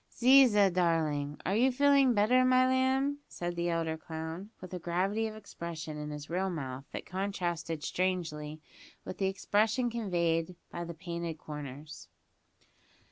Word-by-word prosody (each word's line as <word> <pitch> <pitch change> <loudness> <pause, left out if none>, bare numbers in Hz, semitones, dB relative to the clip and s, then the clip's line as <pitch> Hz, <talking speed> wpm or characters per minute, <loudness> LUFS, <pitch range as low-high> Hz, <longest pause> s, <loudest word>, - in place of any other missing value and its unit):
"Ziza, 235 -6 +6
darling, 155 -5 0
are 195 - +1
you 255 +4 +4
feeling 275 -1 +4
better, 235 +5 +4
my 255 0 +5
lamb?" 265 +2 +2
said 175 0 -4
the 170 0 -1
elder 165 -1 -1
clown, 160 +5 -6
with 185 0 -10
a 180 - -3
gravity 190 +6 0
of 215 - -7
expression 170 -6 -7
in 150 0 -5
his 150 0 -7
real 185 +3 -1
mouth 135 -6 -5
that - - -6
contrasted 175 -5 -3
strangely 155 -4 -2 0.5
with - - -7
the 195 - +2
expression 215 +5 +1
conveyed 175 -6 0 0.2
by 170 - -4
the 170 0 -7
painted 170 -1 -5
corners. 150 - -8
175 Hz, 145 wpm, -31 LUFS, 160-215 Hz, 0.5 s, Ziza